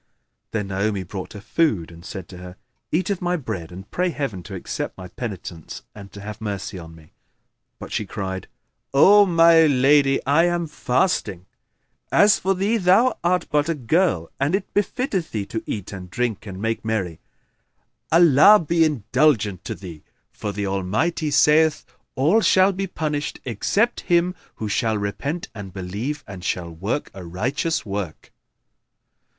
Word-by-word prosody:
Then 105 -3 -3
Naomi 100 0 -1
brought 95 +1 -7
her 105 - -8
food 100 - 0
and 85 0 -13
said 95 -4 -7
to 90 - -10
her, 90 0 -10 0.4
"Eat 185 +4 0
of 195 - -2
my 180 0 0
bread 100 - -5
and 95 +3 -10
pray 180 +1 0
Heaven 140 - -4
to 95 +2 -8
accept 90 - -5
my 90 -1 -9
penitence 90 -7 -7
and 100 -1 -11
to 100 - -10
have 105 +1 -8
mercy 100 -2 -4
on 80 -1 -11
me." 80 -1 -18 0.7
But - - -9
she 105 - -2
cried, 95 -1 -5 0.5
"O 200 +8 +7
my 165 -2 +6
lady, 135 0 +4
I 150 +5 +4
am 175 -1 0
fasting. 125 - -1 0.7
As 205 +1 +5
for 195 0 +1
thee, 200 +5 +1
thou 200 +6 +3
art 180 0 +2
but 150 +2 +2
a 165 - +1
girl 140 - +1
and 140 +6 +2
it 195 -1 -4
befitteth 205 - -1
thee 105 -3 -2
to 110 +2 -4
eat 100 -2 -5
and 90 -2 -8
drink 120 -1 -2
and 95 -1 -7
make 115 +2 -2
merry; 100 -7 -2 0.9
Allah 170 +4 +7
be 165 +1 +2
indulgent 115 - +1
to - - -4
thee!; 85 -4 -10 0.3
for 105 - -5
the 100 0 -3
Almighty 100 - -1
saith: 150 +2 +4 0.3
All 160 +12 +3
shall 190 -1 +5
be 195 +1 -3
punished 150 -4 -3
except 200 - 0
him 175 +1 +3 0.2
who 110 - -4
shall 110 +1 0
repent 140 +11 -3
and 100 -4 -8
believe 100 +11 -4
and 95 -3 -9
shall 85 -2 -2
work 100 - -3
a 95 - -9
righteous 130 - -2
work." 100 -5 -5
120 Hz, 165 wpm, -22 LUFS, -, 0.9 s, O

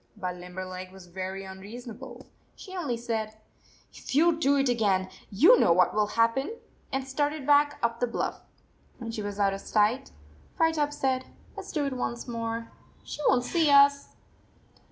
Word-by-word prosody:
But 180 -1 -3
Limberleg 185 +1 -7
was 190 -1 -13
very 190 +2 -5
unreasonable. 240 +6 -9 0.3
She 380 -2 -10
only 290 -10 -2
said, 220 -2 -3 0.3
<( - - -30
If - - -7
you 330 +3 +5
do 285 -3 +3
it 275 -1 +2
again, 200 -6 +1 0.2
you 325 - +6
know - - +4
what 180 +2 +4
will 210 0 +2
happen," 250 - +2 0.4
and 265 0 -2
started 290 +1 -1
back 290 0 +4
up 235 0 0
the 245 - +1
bluff. 235 - -3 0.6
When 230 -2 -6
she 225 - -4
was 205 0 -5
out 200 -1 +3
of 195 - -6
sight, 215 +4 +1 0.5
Firetop 320 -3 +2
said: 260 -3 -1 0.2
" - - -27
Let - - -7
s - - -7
do 295 -2 -1
it 275 - -2
once 245 -1 -4
more. 230 -1 -4 0.3
She - - -8
won 245 -2 +3
t - - -6
see 330 -3 +3
us 280 0 +5
235 Hz, 180 wpm, -28 LUFS, 205-280 Hz, 0.6 s, you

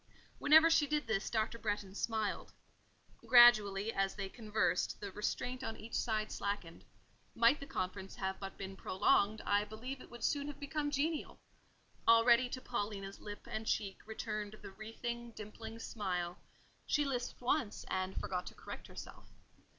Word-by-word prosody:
Whenever 315 +2 +8
she 320 -3 +4
did 300 -1 0
this, 215 -3 -1
Dr. 225 +1 -1
Bretton 205 -3 -2
smiled. 220 0 -2 0.7
Gradually, 225 -3 +6
as 195 0 0
they 195 -1 -4
conversed, 210 -5 0
the 200 -1 -5
restraint 250 +5 -2
on 225 - -4
each 225 +1 -10
side 215 -2 0
slackened: 200 -5 -3 0.5
might 235 +5 +5
the 280 - -8
conference 190 +1 -4
have 190 0 -3
but 195 -1 -7
been 195 0 -6
prolonged, 200 +3 +2
I 205 0 +2
believe 245 +6 -7
it - - -12
would 240 -1 -10
soon 285 -1 +1
have 295 -1 -7
become 290 +1 -2
genial: 300 +2 -1 0.7
already 235 +2 +6
to 255 - -4
Paulina's 205 -5 -4
lip 205 -1 -8
and 220 0 -4
cheek 195 -2 -1
returned 215 -1 -4
the - - -8
wreathing, 235 +3 -6
dimpling 220 +2 -8
smile; 180 -6 -3 0.5
she 295 -1 +2
lisped 250 -3 -3
once, 245 -3 0
and 185 0 -2
forgot 180 -1 -3
to - - -8
correct - - -8
herself. - - -10
220 Hz, 155 wpm, -35 LUFS, 200-245 Hz, 0.7 s, Whenever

